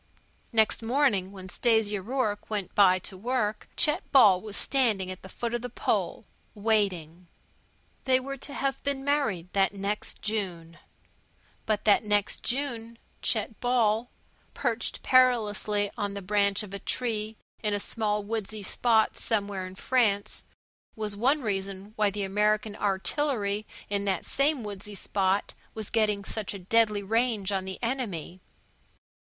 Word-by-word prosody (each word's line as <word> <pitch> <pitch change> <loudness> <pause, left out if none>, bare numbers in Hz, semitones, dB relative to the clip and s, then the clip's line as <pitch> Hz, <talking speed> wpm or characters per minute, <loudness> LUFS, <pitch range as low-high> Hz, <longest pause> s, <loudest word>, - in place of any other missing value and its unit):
Next 220 -1 +3
morning, 230 -6 +2
when 190 -2 -9
Stasia 210 0 +1
Rourke 220 -1 -2
went 205 -4 -3
by 185 -2 +6
to 190 - -5
work, 215 +1 -1
Chet 300 -2 +4
Ball 205 -10 +7
was 210 -2 -6
standing 220 -9 +1
at 185 - -8
the 190 - -11
foot 235 +4 -4
of 240 - -1
the 250 - -5
pole, - - -1 0.3
waiting. 190 -6 0 0.8
They 260 -1 +4
were 275 +1 -5
to 280 +2 -7
have 270 -1 -1
been 280 -1 -2
married 245 - 0
that 195 0 +2
next 200 +2 -2
June. 175 -6 -3 0.9
But 215 -1 0
that 210 0 +5
next 205 -1 +1
June 235 -4 -2 0.2
Chet 220 -1 0
Ball, 240 -1 +2 0.5
perched 240 -3 -2
perilously 210 -5 +3
on 205 -1 -3
the 200 - -5
branch 200 +1 +1
of 200 -2 -10
a 200 - -4
tree 220 -2 -2 0.2
in 210 -1 0
a - - -1
small 210 0 -1
woodsy 215 -1 -3
spot 220 +2 +2
somewhere 200 -4 -1
in 185 - -11
France, 210 -3 +1 0.5
was 215 -2 -3
one 265 +7 +2
reason 195 -1 -3
why 210 -1 +3
the 200 0 -3
American 210 +2 +1
artillery 210 +1 0 0.2
in 200 0 -1
that 190 -3 0
same 280 -2 +1
woodsy 205 0 -6
spot 195 +1 0 0.2
was 220 -2 -4
getting 210 -3 +1
such 210 -1 -4
a - - -6
deadly 215 -1 +3
range 220 -1 +1
on 190 -1 -1
the 190 0 -5
enemy. 200 - -3
210 Hz, 150 wpm, -28 LUFS, 200-235 Hz, 0.9 s, Ball